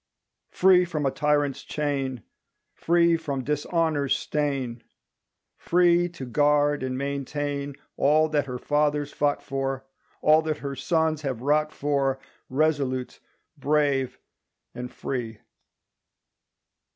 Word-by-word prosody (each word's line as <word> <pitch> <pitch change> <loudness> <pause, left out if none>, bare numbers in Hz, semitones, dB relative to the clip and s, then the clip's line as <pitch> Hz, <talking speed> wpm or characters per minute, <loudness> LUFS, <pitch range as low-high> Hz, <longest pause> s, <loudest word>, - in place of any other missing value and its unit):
Free 185 -1 +5
from 160 -4 -3
a 135 - +2
tyrant's 145 -2 +1
chain, 135 -5 -2 0.5
Free 170 0 +3
from 140 -5 -4
dishonor's 150 0 0
stain, 135 -6 -2 0.8
Free 175 0 +3
to 165 -6 -8
guard 145 +3 +2
and 130 -1 -2
maintain 140 +1 -3 0.2
All 155 +2 +4
that 145 -2 0
her 125 -1 -4
fathers 145 +1 0
fought 145 -1 0
for, 135 0 -3 0.4
All 155 +1 +6
that 155 -1 -2
her 140 -1 -5
sons 160 0 0
have 130 -5 -3
wrought 150 +2 +2
for, 140 -2 0 0.3
Resolute, 135 -3 0 0.4
brave, 140 -3 +1 0.6
and 125 0 -6
free! 115 -4 -4
145 Hz, 110 wpm, -26 LUFS, 135-155 Hz, 0.8 s, All